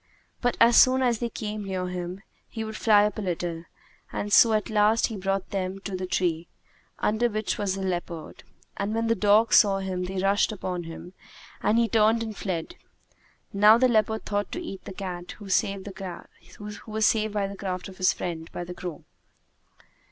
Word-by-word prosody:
But 245 -1 0
as 235 0 +6
soon 260 0 +6
as 240 -3 +1
they 235 - -2
came 210 -1 -5
near 185 -2 -3
him, 180 +2 -5 0.3
he 225 - -5
would 220 0 -6
fly 210 -2 +5
up 210 0 -2
a - - -2
little; 175 -3 -3 0.5
and 205 0 -3
so 230 -2 +7
at 215 +1 0
last 215 +1 +3
he 225 - -4
brought 195 0 -2
them 190 -1 -2
to 195 -1 -5
the 185 0 -4
tree, 170 -2 -1 0.5
under 225 +3 +1
which 215 -1 -2
was 200 -2 0
the 195 - -4
leopard. 175 -3 -4 0.3
And 205 +2 -2
when 225 0 0
the 230 - +3
dogs 215 +1 +4
saw 200 -2 +5
him 185 -2 -3
they 190 +1 -5
rushed 200 +3 +2
upon 180 -4 -4
him 165 +2 -9 0.5
and 215 - +2
he 235 0 +3
turned 225 0 +3
and 220 -2 -6
fled. 190 - -4 0.8
Now 210 +3 +7
the 255 +2 +4
leopard 220 -2 +1
thought 205 0 -2
to - - -3
eat 195 - -8
the - - -7
cat 180 -2 -6
who 205 - -12
was 190 - -1
saved 195 -1 0 1.5
by 205 -1 0
the 200 0 -6
craft 185 -2 -4
of 190 -1 -12
his 185 - +4
friend 165 -2 -5
the 175 0 -6
crow. 175 -3 -7
200 Hz, 190 wpm, -26 LUFS, 185-220 Hz, 1.5 s, so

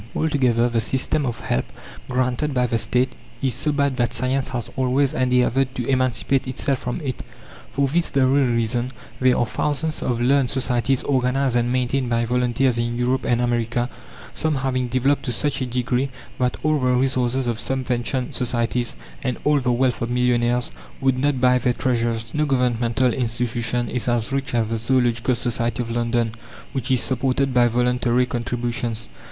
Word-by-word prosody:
Altogether, 125 -7 +2
the 115 -1 0
system 135 +4 0
of 120 -1 -4
help 65 - -1 0.4
granted 130 +3 0
by 125 0 +3
the 115 -1 0
State 125 +2 +1 0.3
is 130 -2 +2
so 150 - -1
bad 140 -2 0
that 120 0 0
science 130 +2 0
has 120 -3 -4
always 130 +1 +1
endeavoured 130 +1 +2
to 125 - -2
emancipate 130 -1 +1
itself 130 +1 -1
from 125 - -3
it. 130 -5 -4 0.5
For 140 0 +1
this 165 +5 +2
very 135 0 +3
reason 120 +2 0 0.3
there 130 -1 +4
are 120 - +2
thousands 150 +6 -2
of 120 -2 -1
learned 130 +1 +3
societies 130 -1 +1
organized 130 -1 +1
and 120 0 +1
maintained 130 0 0
by 115 0 +1
volunteers 125 +1 +1
in 120 0 -1
Europe 125 +2 0
and 120 0 +2
America, 120 0 0 0.4
some 155 -1 0
having 130 -2 -1
developed 130 +3 +1
to 125 - -1
such 140 +4 -1
a 130 - -1
degree 125 +2 0 0.3
that 125 -1 0
all 155 0 +2
the 125 -1 +2
resources 130 0 +1
of 120 -2 -1
subventioned 130 0 -2
societies, 120 -1 -1 0.3
and 125 -2 -1
all 150 -1 +3
the 125 -2 0
wealth 125 0 +1
of 115 - -1
millionaires, 125 0 +1 0.3
would 130 -1 +1
not 140 -1 +1
buy 125 0 +4
their 125 0 +1
treasures. 115 -2 -1
No 150 0 +1
governmental 125 -2 +1
institution 120 0 -1
is 125 0 -3
as 120 +1 0
rich 135 -2 -2
as 115 -1 +2
the 115 +1 -2
Zoological 120 +1 +1
Society 120 -1 -1
of 115 - -6
London, 120 -1 0 0.4
which 135 -4 -3
is 130 -2 +3
supported 130 +1 0
by 120 -1 +5
voluntary 125 +1 +2
contributions. 120 -2 -3
125 Hz, 170 wpm, -22 LUFS, 120-130 Hz, 0.5 s, by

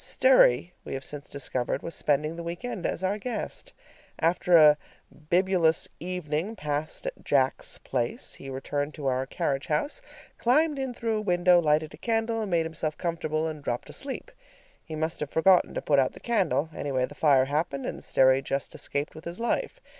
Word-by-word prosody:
Sterry, - - +4
we - - -5
have 135 0 -6
since 145 -1 -7
discovered, 130 -3 -2
was 165 - -5
spending 150 +2 0
the 170 - -6
week 170 +7 -5
end 220 -7 -3
as 185 - -3
our 200 +3 0
guest. 250 - -5 0.5
After 170 +1 +4
a 150 -2 +8 0.5
bibulous 175 -3 +3
evening 180 +2 -3
passed 150 -3 -4
at - - -5
"Jack's 135 -2 +1
Place," 120 -3 -3
he 135 - -9
returned 145 +2 -3
to 145 - -7
our 130 0 0
carriage 135 0 -2
house, 285 - -1 0.4
climbed 290 +4 +3
in 265 -2 -3
through 225 -2 -1
a - - -1
window, 180 -2 +4
lighted 155 -1 +1
a - - -11
candle, 225 +2 0
made 170 -3 +1
himself 160 -1 -3
comfortable, 160 -2 -1
and 155 -2 -5
dropped 120 -3 -3
asleep. 280 - -7 0.5
He 160 - -7
must 160 +1 -2
have 150 - -3
forgotten 180 +4 +4
to - - -3
put 145 -2 +3
out 130 - +2
the - - -11
candle; 180 -9 0
anyway, 130 -3 0
the - - -12
fire 140 -4 +4
happened, 140 -1 -2
and - - -5
Sterry 130 0 +4
just 135 0 -3
escaped 145 +1 -3
with 155 - -12
his 170 +4 -6
life. 470 - -1
160 Hz, 185 wpm, -27 LUFS, 145-190 Hz, 0.5 s, a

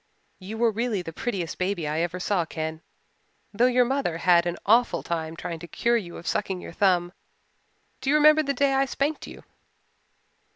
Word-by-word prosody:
"You 205 +4 -7
were 230 0 +3
really 220 -3 -2
the 165 - -7
prettiest 185 -4 -4
baby 185 -4 -1
I 155 +2 -1
ever 175 +2 -2
saw, 180 -1 0
Ken, 160 0 -5 0.7
though 235 +5 +4
your 250 0 +3
mother 260 -10 -1
had 175 0 +4
an 175 - -2
awful 235 +4 +3
time 165 -1 -3
trying 170 -1 -6
to 170 - -9
cure 235 +7 +1
you 180 -7 -3
of - - -11
sucking 190 -1 -1
your - - -9
thumb. 180 -2 +2 0.9
Do 270 - -2
you 295 - +4
remember 305 +1 +6
the 280 -2 -1
day 275 +1 +2
I 270 0 +3
spanked 280 +3 -2
you?" - - -11
190 Hz, 190 wpm, -25 LUFS, 170-245 Hz, 0.9 s, remember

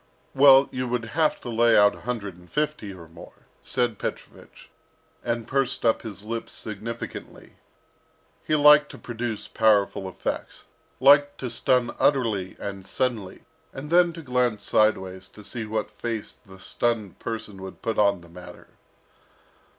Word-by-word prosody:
"Well, 135 0 +7
you 130 0 -3
would 120 -1 -2
have 155 0 +2
to 120 - -7
lay 115 0 +4
out 105 0 +6
a - - -12
hundred 105 -6 -4
and 90 0 -18
fifty 150 -8 -2
or 85 -4 -11
more," 85 +1 -15 0.2
said 120 -4 -1
Petrovich, - - -8 0.5
and 115 -1 -2
pursed 135 -3 -1
up 115 - +3
his 105 -3 -7
lips 115 +1 -5
significantly. 110 +2 -8 0.9
He 155 - +1
liked 150 0 +7
to - - -10
produce 120 -2 -5
powerful 100 -3 +2
effects, - - -5 0.3
liked 145 +2 +5
to 125 -3 -3
stun 120 +1 +1
utterly 110 -10 +1
and 100 -1 -6
suddenly, 110 -3 -3 0.3
and 150 +3 -8
then 175 0 +5
to 165 -1 -9
glance 125 -5 0
sideways 95 -3 +1
to 105 - -14
see 115 +1 -4
what 110 -1 -3
face 110 +1 -4 0.2
the 95 0 -14
stunned 110 -1 -2
person 105 -4 -5
would 95 0 -10
put 115 -2 -1
on 100 -3 +3
the 85 - -15
matter. 90 +1 -13
115 Hz, 150 wpm, -25 LUFS, 100-130 Hz, 0.9 s, Well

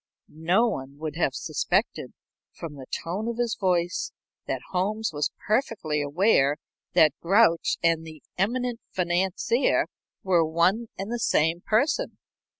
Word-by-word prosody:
No 175 +9 +2
one 140 - -5
would 155 0 -5
have 145 -6 +1
suspected, - - -1 0.4
from 165 -3 -7
the 135 -3 -10 0.2
tone 190 +7 -3
of 235 -1 -3
his 240 -2 0
voice, 180 -2 0 0.4
that - - -2
Holmes 210 +4 -1
was 145 0 0 0.2
perfectly 210 - 0
aware 145 -1 +3 0.4
that 160 -5 +5
Grouch 190 -1 +3
and 165 -1 +2
the 155 -3 -11
eminent 240 +4 -1
financier 185 +7 +1 0.4
were 180 -3 +3
one 170 +8 +1
and 195 +4 -5
the 240 - -2
same 165 -4 +2
person. 290 - +1
180 Hz, 135 wpm, -26 LUFS, 160-220 Hz, 0.4 s, that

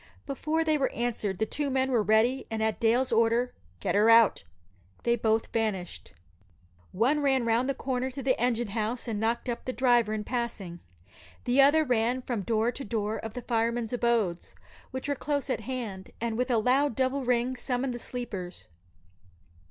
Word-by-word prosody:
Before 305 +4 -1
they 310 -2 +1
were 270 - +1
answered 225 -5 -2
the 220 - +1
two 285 +5 -2
men 265 0 +1
were 240 -3 +3
ready, 220 +5 +2
and 220 0 -2
at 220 -1 0
Dale's 240 +3 +2
order, 230 +2 +2 0.3
"Get - - -1
her 210 +2 +4
out!" 230 - +6 0.6
they 235 0 +3
both 220 -1 0
vanished. 210 -6 -3 0.8
One 250 +10 +2
ran 265 -4 +2
round 230 +3 +1
the 275 - 0
corner 260 -1 -2
to 265 +1 -7
the 255 0 +3
engine 240 -2 +1
house 225 +4 -2
and 220 -3 -2
"knocked 230 +3 -1
up" 240 -1 -3
the 255 - -1
driver 240 -4 +3
in 215 -1 -2
passing. 215 -8 -4 0.6
The 250 +3 +4
other 295 +3 +5
ran 250 -1 0
from 240 -5 -2
door 225 +3 +1
to 275 - -7
door 215 -1 -2
of 225 0 -7
the 250 - -5
firemen's 230 0 -1
abodes, 235 -8 0 0.3
which 260 +1 -5
were 285 - +1
close 285 0 -2
at - - -1
hand, 225 -5 -5
and 230 -1 -2
with 250 +3 -1
a 240 - +3
loud 255 +3 +2
double 265 +1 0
ring 250 +1 +1
summoned 250 +1 -2
the 240 - -6
sleepers. 195 - -6
240 Hz, 185 wpm, -28 LUFS, 220-260 Hz, 0.8 s, out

